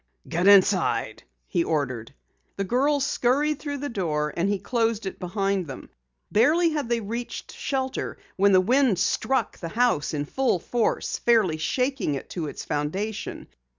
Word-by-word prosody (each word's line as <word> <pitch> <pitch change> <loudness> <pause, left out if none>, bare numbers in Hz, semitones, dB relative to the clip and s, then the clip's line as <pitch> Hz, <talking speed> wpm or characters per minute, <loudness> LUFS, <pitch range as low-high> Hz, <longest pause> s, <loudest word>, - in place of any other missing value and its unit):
"Get 175 +3 0
inside!" 200 -2 +4 0.3
he 170 - +1
ordered. 140 -7 -2 0.4
The 195 - -2
girls 275 +7 +1
scurried 285 +3 +1
through 290 -1 -4
the 285 +1 -4
door 150 -8 -1
and 175 +4 +1
he 205 - +1
closed 225 +1 -1
it 190 - -5
behind 195 0 -1
them. 135 - -9 0.4
Barely 320 +10 +4
had 295 -6 -2
they 235 -1 +1
reached 230 +3 -5
shelter 265 -1 -3 0.2
when 200 +1 +4
the 185 -1 +6
wind 250 0 +3
struck 265 +8 0
the 165 - -5
house 220 -9 +1
in 145 0 -2
full 260 - +1
force, 230 +6 -1
fairly 215 -9 +3
shaking 250 - 0
it 135 - -7
to 165 -4 -3
its - - -7
foundation. 190 +9 -3
205 Hz, 155 wpm, -25 LUFS, 175-255 Hz, 0.4 s, the